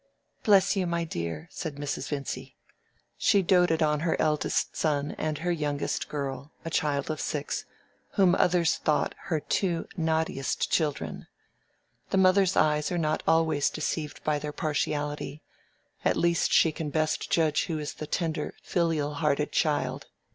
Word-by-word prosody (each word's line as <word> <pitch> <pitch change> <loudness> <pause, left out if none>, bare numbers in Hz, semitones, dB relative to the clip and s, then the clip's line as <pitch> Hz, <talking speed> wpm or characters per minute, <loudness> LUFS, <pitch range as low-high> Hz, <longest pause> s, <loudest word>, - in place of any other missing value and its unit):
"Bless 195 -1 +4
you, 190 -2 0
my 170 0 0
dear," 85 - -4
said 155 -4 -5
Mrs. 145 0 -4
Vincy. 140 -2 -4 0.6
She 200 -1 +4
doted 175 -3 +3
on 150 -1 +2
her 165 +1 0
eldest 150 -1 +1
son 145 -2 0
and 155 -1 -1
her 175 +4 -1
youngest 145 -3 -2
girl 140 0 -4
(a 165 - -4
child 145 -1 0
of 155 - -4
six), 145 -1 -3 0.5
whom 190 -4 +4
others 175 -2 +3
thought 150 - +1
her 160 -3 0
two 170 +2 -1
naughtiest 160 -5 -1
children. 150 -4 -1 0.8
The - - +1
mother's 190 0 +4
eyes 150 0 +2
are 175 - 0
not 155 -2 0
always 160 -3 +3
deceived 150 -2 -3
in 150 -1 +1
their 150 0 -4
partiality: 150 -1 -2 0.6
she - - +3
at - - +1
least 170 -1 +2 0.2
can 155 -1 -4
best 155 +1 0
judge 155 -2 +2
who 165 - -2
is 150 -1 -4
the 155 - -7
tender, 160 -1 -2
filial 160 -4 0
hearted 150 0 0
child. 145 -4 0
155 Hz, 150 wpm, -28 LUFS, 150-170 Hz, 0.8 s, Bless